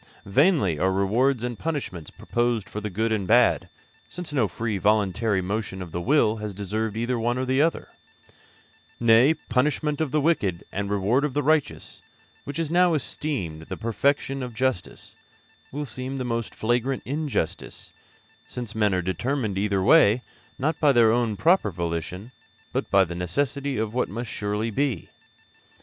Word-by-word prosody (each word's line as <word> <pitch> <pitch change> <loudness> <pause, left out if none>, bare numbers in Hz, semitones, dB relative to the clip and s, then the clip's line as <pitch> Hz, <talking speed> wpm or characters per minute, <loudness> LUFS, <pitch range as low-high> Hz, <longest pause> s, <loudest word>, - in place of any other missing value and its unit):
Vainly 130 - +3
are 95 +3 +2
rewards 115 +7 +1
and 120 -2 -4
punishments 140 - -4
proposed 120 -3 -1
for 105 - -6
the 105 - -3
good 110 +4 -1
and 100 -4 -1
bad, 120 +2 +4 0.4
since 175 -4 -7
no 125 -7 +2
free 110 +4 -3
and - - -8
voluntary 105 -1 +2
motion 105 0 -3
of 90 -3 -7
the 85 - -3
will 115 - +3
has 105 -2 -5
deserved 105 +2 -3
either 120 +1 -1
one 120 +2 0
or 130 - -1
the 130 +2 +2
other; 165 +2 0 1.1
nay, 120 +5 +5
the 160 - -18
punishment 150 +3 0
of 155 - 0
the 150 - +1
wicked 105 - +1
and 100 0 -3
the - - 0
reward 110 +8 +2
of 150 -3 -2
the 145 - +1
righteous, 155 0 0 0.4
which 140 0 -5
is 165 -2 -2
now 175 -1 +4
esteemed 125 - -3
the - - -4
perfection 135 +4 0
of 125 -3 -6
justice, 130 -6 -2 0.6
will 145 +2 -4
seem 130 +2 -5
the 130 - -3
most 115 -2 -3
flagrant 120 +3 0
injustice, 145 - -3 0.5
since 120 -3 -6
men 105 -3 +2
are 90 - -1
determined 110 - -1
either 100 -1 0
way 125 -3 +5 0.3
not 150 +4 -1
by 150 -2 +5
their 115 -4 +5
own 115 -3 0
proper 170 - +3
volition, 85 +4 -4 0.4
but - - -2
by 100 -1 +5
the 85 -2 -5
necessity 140 - -2
of 110 0 -2
what 125 - 0
must 115 +3 -5
surely 105 +2 -2
be. 135 +2 -1
115 Hz, 170 wpm, -25 LUFS, 100-140 Hz, 1.1 s, nay